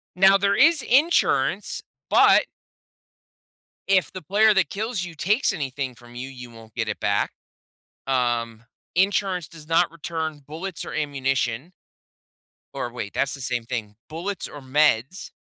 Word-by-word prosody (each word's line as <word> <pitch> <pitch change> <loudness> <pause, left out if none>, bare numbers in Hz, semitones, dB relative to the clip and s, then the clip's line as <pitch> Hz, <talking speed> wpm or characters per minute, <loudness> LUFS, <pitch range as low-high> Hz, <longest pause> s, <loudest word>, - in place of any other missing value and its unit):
Now, 195 +1 +6
there 200 0 +2
is 325 +4 +5
insurance, 295 +8 +2 0.3
but - - +6 1.5
If 190 -2 +3
the 185 - -6
player 210 +6 +4
that 190 - +2
kills 215 -2 -3
you 170 -2 -8
takes 210 - +2
anything 135 -2 -4
from 120 0 -16
you, 130 +2 -6
you 125 -2 -10
won't 115 -1 -15
get - - -1
it - - -4
back. - - +1 0.8
Um, 120 -3 -1 0.3
insurance 190 -2 +1
does 160 -2 -14
not 165 +1 +3
return 160 -2 -5
bullets 170 +6 -6
or - - -7
ammunition. 135 0 -1 1.0
Or 120 - -4
wait, 105 -4 -6
that's 140 -1 0
the 140 - -7
same 125 -2 -2
thing 110 -4 -4
bullets 175 +5 -4
or 145 - -10
meds. 145 +3 +1
150 Hz, 145 wpm, -24 LUFS, 125-190 Hz, 1.5 s, Now